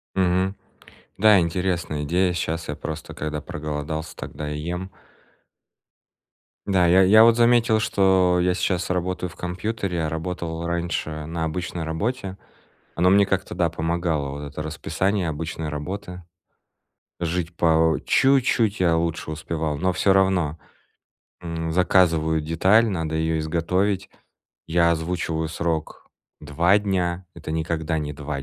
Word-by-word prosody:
Мгм. 95 +1 +1 0.6
Да, 105 0 +6
интересная 85 -3 -1
идея. 90 +4 +1
Щас 85 -1 -3
я - - -3
просто 80 0 -6
когда 75 0 -4
проголодался, 75 +1 -5
тогда 75 -1 -6
и 75 - -4
ем. 90 +4 -4 1.8
Да, 95 -3 +3
я 90 +3 +6
я 110 +4 +7
вот 115 0 +5
заметил, 120 -2 +4
что 95 -4 +3
я 90 0 +2
сейчас 90 -1 -1
работаю 90 0 -2
в - - -15
компьютере, 90 -1 -3
а - - -1
работал 80 +1 -4
раньше 85 -3 -3
на 80 0 -3
обычной 85 +1 -3
работе. 95 +4 -3 0.6
Оно 90 +2 +3
мне 100 0 +5
как-то 95 0 -2
да, 85 - +1
помогало 80 -3 -1
вот 70 +1 -6
это 75 +1 -5
расписание 85 +5 -1
обычной 80 +1 -4
работы. 90 +5 -6 1.0
Жить 85 0 -2
по 80 -1 +3
чуть-чуть 125 -5 +3
я 85 -3 +3
лучше 80 -1 -2
успевал, 80 -1 -3
но 95 +5 +1
всё 95 +3 +2
равно. 95 -5 +2 0.8
М, 80 -1 -4
заказываю 80 -2 +3
деталь, 95 +9 +3
надо 80 -5 -2
ее 80 0 0
изготовить. 90 +5 -1 0.6
Я 85 0 +3
озвучиваю 80 -1 -2
срок 80 -1 -3 0.3
два 85 +7 +3
дня, 95 -3 -1
это 80 - -7
никогда 80 0 -1
не 75 -1 -4
два 75 -1 -5
85 Hz, 135 wpm, -23 LUFS, 80-95 Hz, 1.8 s, я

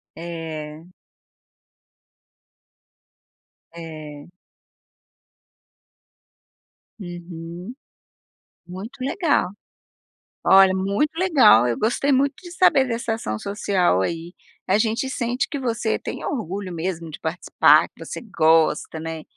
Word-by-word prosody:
É. 160 -1 -7 2.8
É. 155 -3 -9 2.7
Uhum. 175 +2 -8 0.9
Muito 200 +9 -9
legal. 280 - +1 1.0
Olha, 190 -1 +7
muito 200 +10 0
legal, 285 - +6
eu 120 - -1
gostei 245 +6 +1
muito 275 +1 +2
de 350 - -11
saber 335 -7 +4
dessa 230 -1 -2
ação 110 - -4
social 190 - +1
aí, 165 - -4 0.3
a 190 - +3
gente 225 +4 0
sente 250 +1 -1
que 285 - -4
você 230 -3 -1
tem - - -6
orgulho 195 - -4
mesmo 165 -1 -4
de 150 - -9
participar, 165 +2 +3
que - - -12
você - - -6
gosta, 160 -6 +2
né. 160 -1 -6
185 Hz, 95 wpm, -22 LUFS, 165-235 Hz, 2.8 s, Olha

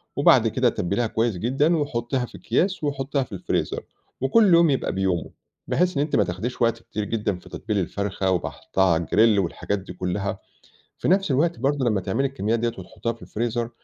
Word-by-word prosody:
وبعد - - +5
كده - - +2
تبّليها 100 +6 -1
كويس 110 -3 0
جدًا 140 - +2
وحطّيها 125 -3 -1
في - - -12
اكِياس 180 - 0
وحطيها 140 -1 -1
في - - -15
الفريزر. 95 -2 -2 0.4
وكُلّ 190 +8 +5
يوم 170 -1 +6
يبقى 135 - 0
بيومه، 95 -4 -1 0.4
بحيث 180 -3 +1
إن - - +2
أنتِ 150 - -1
ما 105 - +4
تاخديش 100 +9 -4
وقت 115 0 +2
كتير 105 - -4
جدًا 105 -3 -2
في - - -15
تتبيل 105 +1 -3
الفرخة 95 +1 -1
وباحطها 95 +1 -1
على 80 +1 0
الgrill 110 -2 +4
والحاجات 100 +4 -2
دي 95 -1 -9
كلّها، 95 +3 -3 0.6
في - - -2
نَفس 190 -3 +3
الوقت 155 +1 +1
برضو 135 0 +1
لمّا 105 -4 +1
تعملي 115 +9 0
الكميات 115 -4 -1
ديّة 120 - +1
وتحطيها 95 +5 -4
في 115 - -19
الفريزر، 120 +1 -2
115 Hz, 185 wpm, -24 LUFS, 100-135 Hz, 0.6 s, يوم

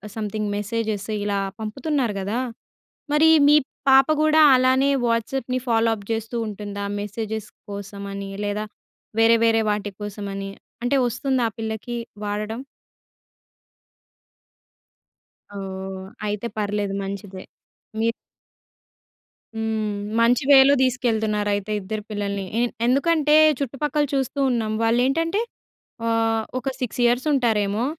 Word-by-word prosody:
Something 215 -1 -3
messages 215 -1 -3
ఇలా 205 -1 0 0.2
పంపుతున్నారు 245 +1 -1
కదా! 200 +5 -2 0.8
మరి 310 +2 +5 0.2
మీ 295 - +7 0.3
పాప 270 +1 +6
కూడా 310 0 +4
అలానే 260 +2 +4 0.2
వాట్సాప్‌ని 235 +2 -1
ఫాలో 230 -1 +3
అప్ 200 -2 -13
చేస్తూ 225 +1 -3
ఉంటుందా 205 -1 -5 0.2
మెసేజెస్ 215 +1 -4 0.2
కోసమని? 200 -1 -6 0.2
లేదా 205 +1 -2 0.6
వేరే, 230 +1 +6
వేరే 225 0 +4
వాటి 210 0 -2
కోసమని 200 -1 -5 0.3
అంటే 245 +3 +2
వస్తుందా 255 +1 0
ఆ - - -26
పిల్లకీ 220 +2 -4 0.3
వాడడం? 210 +2 -3 3.0
ఓహ్! 190 -1 -6 0.2
అయితే 210 +2 -2
పర్లేదు 205 -1 -1
మంచిదే. 195 -1 -6 0.6
మీరు 230 +1 +2 1.4
హ్మ్. 220 -2 -1 0.2
మంచి 245 +4 +3
వేలో 275 0 +8
తీసుకెళ్తున్నారైతే 215 -5 0
ఇద్దరు 210 +2 -5
పిల్లల్ని. 200 -1 -3
ఎ - - +2 0.3
ఎందుకంటే 300 +3 +3 0.2
చుట్టుపక్కల 290 +2 -1
చూస్తూ 270 +1 -1
ఉన్నాం. 225 -3 0
వాళ్ళేంటంటే 270 - +2 0.7
ఆహ్, 225 -1 +1
ఒక 255 - -4
6 250 -2 -3
ఇయర్స్ 240 +4 +2
ఉంటారేమో, 220 -4 +1
220 Hz, 105 wpm, -23 LUFS, 205-250 Hz, 3.0 s, వేలో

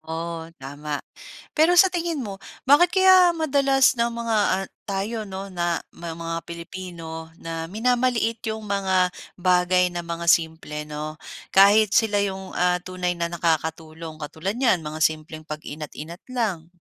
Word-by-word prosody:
Oh, 165 +1 -5
tama. 145 +1 -5 0.6
Pero 320 +3 +5
sa 355 +2 +7
tingin 340 -4 -2
mo 200 -5 -5 0.3
bakit 350 +6 +5
kaya 370 -2 +7
madalas 275 -5 +3
na 235 0 +1
mga, 230 -1 -1 0.2
ah, 195 - -5 0.2
tayo 210 +3 -3
'no, 195 0 -6
na 175 -2 -1 0.2
ma 170 -1 -6
mga 165 0 -5
Pilipino 170 -1 -8
na 165 0 -4
minamaliit 230 +3 0
yung 220 -1 -4
mga 190 -2 +2 0.3
bagay 180 0 +3
na 175 -1 -5
mga 170 0 -4
simple, 160 -2 +1
'no? 150 +1 -6 0.3
Kahit 200 +1 +5
sila 215 -3 +3
yung, 190 -1 -3
ah, 180 0 +2
tunay 180 -1 -2
na 170 0 -2
nakakatulong? 160 -1 -2
Katulad 160 +5 -4
niyan 190 -11 +3
mga 155 +1 -6
simpleng 155 0 -1
pag-inat 155 0 -6
inat 165 +4 -8
lang. 210 -10 -2
180 Hz, 145 wpm, -24 LUFS, 160-220 Hz, 0.6 s, sa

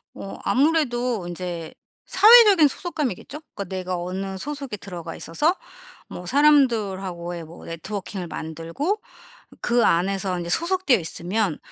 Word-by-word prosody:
어 195 - -8
아무래도 250 - +1
인제 175 -2 -5 0.3
사회적인 415 -5 +8
소속감이겠죠. 300 - -4
그니까 200 - -5
내가 185 0 -4
어느 190 +2 -4
소속에 280 -3 -5
들어가 175 -4 -8
있어서 300 - 0 0.5
뭐 180 - -8
사람들하고의 195 - +2
뭐 160 +2 -12
네트워킹을 185 +2 -5
만들고 165 - -3 0.6
그 240 -1 +2
안에서 190 +2 +1
인제 170 0 -5
소속되어 340 - +2
있으면 175 +2 -2
195 Hz, 315 characters per minute, -23 LUFS, 175-285 Hz, 0.6 s, 사회적인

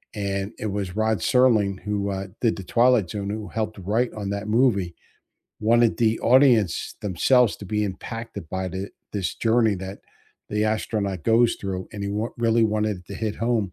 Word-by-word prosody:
and 100 0 -3
it 110 - -3
was 100 -3 -3
Rod 110 0 +1
Serling, 110 -3 +3
who, 105 -1 -2
uh, 95 0 -4
did 115 -3 +2
The 95 - -7
Twilight 120 -1 +3
Zone, 100 0 -4
who 105 0 -4
helped 110 +2 -3
write 110 +6 0
on 100 -2 -5
that 100 +1 -3
movie, 105 -7 +2 0.7
wanted 115 +1 +3
the 115 -2 +1
audience 120 - +3
themselves 110 +5 +3
to - - -10
be 105 +3 -1
impacted 115 -1 -6
by 95 +2 -3
the 95 +2 -5 0.2
this 100 -3 -2
journey 115 -2 +2
that 95 +1 -7 0.5
the 105 0 0
astronaut 105 -5 -2
goes 115 +1 +4
through, 95 -2 -4
and 100 -1 -6
he - - -2
wa 105 +3 -1
really 115 0 +2
wanted 105 -2 0
it 90 - -17
to 100 - -8
hit 110 +1 -3
home, 115 -5 0
105 Hz, 185 wpm, -24 LUFS, 100-115 Hz, 0.7 s, goes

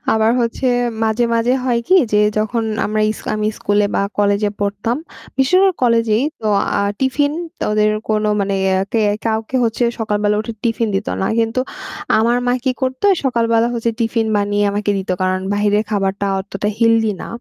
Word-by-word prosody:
আবার 220 0 +3
হচ্ছে 235 +2 -1 0.4
মাঝে, 220 +2 +1
মাঝে 230 +2 +2
হয় 240 -2 +1
কি 370 - +5 0.2
যে - - +4 0.2
যখন 225 +2 0 0.2
আমরা 215 +1 -1
ইসলামি 215 -1 -2
স্কুলে 205 0 +1
বা - - +2 0.2
কলেজে 205 0 +2
পড়তাম 205 +4 -1 0.4
বেশির 270 +8 +3
ভাগ 380 - +3
কলেজেই 230 -2 +3 0.2
তো 220 - -4 0.3
আ - - +1 0.2
টিফিন 280 +2 +1 0.3
তো - - -2
ওদের 210 0 +3 0.2
কোনো 215 -1 +1
মানে 200 0 -1
ইয়া 190 0 +2
কে 230 - +2 0.2
কাউকে 225 +3 -1
হচ্ছে 225 +1 -1 0.2
সকালবেলা 210 -1 0
উঠে 220 +2 -5
টিফিন 230 -1 0
দিতো 195 - -3
না - - +1
কিন্তু 225 +2 +1 0.6
আমার 235 +2 +2
মা 245 - +2
কি 260 - +2
করতো 260 +5 -2 0.2
সকালবেলা 230 -2 +2
হচ্ছে 230 0 0
টিফিন 225 -1 0
বানিয়ে 205 0 +1
আমাকে 205 0 -1
দিত 190 - -5
কারণ 185 0 0
বাহিরের 205 +1 +2
খাবারটা 195 -1 -1 0.2
অতটা 195 +1 -4
হেলদি 225 -1 +3
না - - -6
220 Hz, 170 wpm, -18 LUFS, 205-235 Hz, 0.6 s, কি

